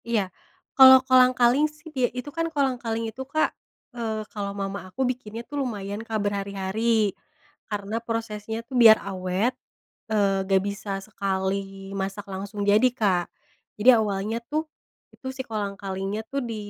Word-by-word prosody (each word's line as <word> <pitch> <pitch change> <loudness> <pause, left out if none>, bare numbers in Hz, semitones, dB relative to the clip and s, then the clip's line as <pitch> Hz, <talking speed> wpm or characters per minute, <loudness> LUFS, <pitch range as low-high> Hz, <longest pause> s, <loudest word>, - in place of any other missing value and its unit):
Iya. 210 -6 -1 0.4
Kalau 260 -1 +10
kolang-kaling 255 +2 +5
sih 300 +1 -15
dia 255 -3 +1
itu 250 +3 -6
kan 330 0 -1
kolang-kaling 250 -6 -1
itu 265 - -8
Kak, 310 +3 +1 0.4
eee, 220 -3 -3
kalau 200 -1 -3
mama 195 -1 -4
aku 260 +8 -1
bikinnya 235 -2 -4
tuh 290 +1 -3
lumayan 205 -4 -4
Kak, 225 -1 -3
berhari-hari. 200 +2 0 0.6
Karena 210 +1 -3
prosesnya 225 -1 -4
tuh 260 - -7
biar 220 -1 +9
awet, 190 +5 -1 0.6
eee, 195 -2 +2
nggak 190 -1 +3
bisa 200 0 -5
sekali 195 -1 -3
masak 195 +1 -4
langsung 200 +2 -5
jadi 210 +5 +5
Kak. 195 -8 +1 0.5
Jadi 210 +5 +5
awalnya 210 +1 -1
tuh, 310 +1 0 0.5
itu 265 - -10
si 265 - -3
kolang-kalinya 200 -1 -3
tuh 275 - -1
di 225 - -3
215 Hz, 145 wpm, -25 LUFS, 195-245 Hz, 0.6 s, Kalau